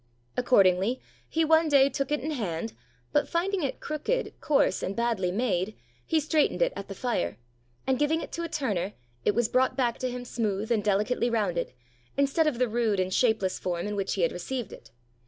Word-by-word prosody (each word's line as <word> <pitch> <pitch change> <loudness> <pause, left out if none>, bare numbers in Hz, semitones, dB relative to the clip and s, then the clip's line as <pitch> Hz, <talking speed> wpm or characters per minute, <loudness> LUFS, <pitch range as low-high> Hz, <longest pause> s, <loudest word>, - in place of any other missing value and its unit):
Accordingly, 200 -1 +3 0.3
he 325 0 +2
one 320 0 +4
day 275 -2 +6
took 275 0 -2
it 295 - +1
in 310 +4 -3
hand, 215 - -3 0.4
but 295 - +2
finding 370 +3 0
it 275 - -2
crooked, 305 +12 -2
coarse, 280 -10 +2
and 195 - -3
badly 230 -6 0
made, 200 -2 -1 0.3
he 320 - +3
straightened 310 0 +1
it - - 0
at - - -6
the - - -7
fire, 105 - -1 0.5
and 265 -1 +1
giving 300 +2 +2
it - - -7
to 340 - -4
a 335 - -3
turner, 210 - -1 0.3
it 205 - +3
was 240 -1 +2
brought 255 +2 +2
back 240 -3 +1
to 255 - -1
him 245 0 -5
smooth 220 -2 -2
and 220 -3 +2
delicately 210 +4 +1
rounded, 200 -7 0 0.5
instead 280 +3 +3
of 285 -6 0
the 250 0 +2
rude 225 -3 +1
and 185 0 0
shapeless 220 -6 +2
form 175 -1 -2
in 210 0 -3
which 195 -1 -1
he 190 - 0
had 165 - +3
received 245 +7 -4
it. - - -13
240 Hz, 200 wpm, -28 LUFS, 200-290 Hz, 0.5 s, day